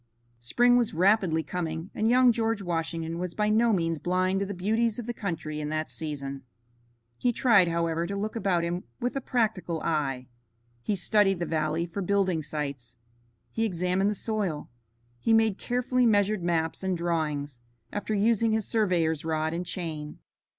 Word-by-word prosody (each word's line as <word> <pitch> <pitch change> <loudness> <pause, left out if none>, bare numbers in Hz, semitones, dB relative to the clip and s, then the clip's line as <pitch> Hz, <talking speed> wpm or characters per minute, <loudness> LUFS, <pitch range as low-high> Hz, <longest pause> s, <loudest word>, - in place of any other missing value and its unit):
Spring 245 - +3
was 235 -8 0
rapidly 180 -3 +3
coming, 165 +2 -4
and 220 +1 +1
young 250 0 +6
George 225 -2 -1
Washington 165 -1 -2
was 180 -1 -4
by 210 0 +1
no 225 +2 +4
means 165 -5 0
blind 185 +2 +1
to 200 - -2
the 200 - -4
beauties 220 +4 +1
of 240 - -5
the 240 - -3
country 165 -8 -4
in 150 - -3
that 155 -3 -2
season. 140 0 -5 0.8
He 245 - +2
tried, 225 -6 +4
however, 170 0 0
to 200 - -4
look 210 +3 -3
about 190 -6 +1
him 175 +1 -3
with 245 +2 -2
a 275 - -1
practical 215 -10 -1
eye. 135 -5 -1 0.6
He 210 - -1
studied 195 0 +3
the 175 - -1
valley 155 +1 -1
for 175 +4 -5
building 190 -3 +1
sites. 140 -6 -5 0.5
He 225 - -1
examined 185 -1 +1
the 210 - -1
soil. 195 - -2 0.5
He 225 - +2
made 225 -3 +3
carefully 250 0 +1
measured 205 -2 +2
maps 165 -2 0
and 190 -2 -1
drawings, 150 -6 -2 0.3
after 210 +1 -2
using 225 +2 +2
his 220 -2 0
surveyor's 175 -8 +1
rod 160 0 -1
and 175 +1 -3
chain. 155 -4 -4
180 Hz, 170 wpm, -27 LUFS, 160-215 Hz, 0.8 s, young